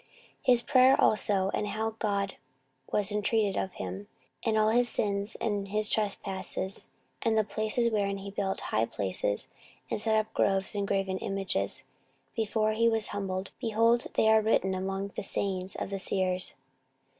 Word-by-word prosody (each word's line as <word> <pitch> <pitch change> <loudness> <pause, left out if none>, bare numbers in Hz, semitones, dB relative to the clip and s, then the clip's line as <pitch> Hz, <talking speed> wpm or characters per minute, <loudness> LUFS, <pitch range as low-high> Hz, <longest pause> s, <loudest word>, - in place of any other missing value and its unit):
14:033:019 - - -34 0.4
His 245 -2 +6
prayer 260 0 +5
also, 195 -2 +4
and 210 - -1
how 220 +2 -2
God 200 -2 -1 0.6
was 205 0 +2
intreated 210 -1 +1
of 190 - -2
him, 95 +2 -6 0.4
and 220 -2 +1
all 215 0 +4
his 240 +2 +3
sins, 200 -1 -1
and 205 -3 -1
his 210 +1 0
trespass, 195 -2 -2 0.3
and 225 -2 +2
the 215 - +4
places 220 +3 0
wherein 200 -2 0
he 195 0 -7
built 195 -1 -2
high 110 +1 0
places, 100 +1 -2 0.4
and - - -1
set 220 0 +2
up 215 0 0
groves 195 +1 +1
and 200 -1 -1
graven 195 -1 0
images, 195 -1 -2 0.5
before 215 -1 +1
he 230 +1 +3
was 225 -1 0
humbled: 190 -1 -3
behold, 230 +1 +2
they 220 - +3
are 220 0 +6
written 200 -3 +2
among 195 +1 -3
the - - -5
sayings 190 -1 -1
of - - -4
the 195 - -2
seers. 185 -1 -1
205 Hz, 165 wpm, -29 LUFS, 195-220 Hz, 0.6 s, His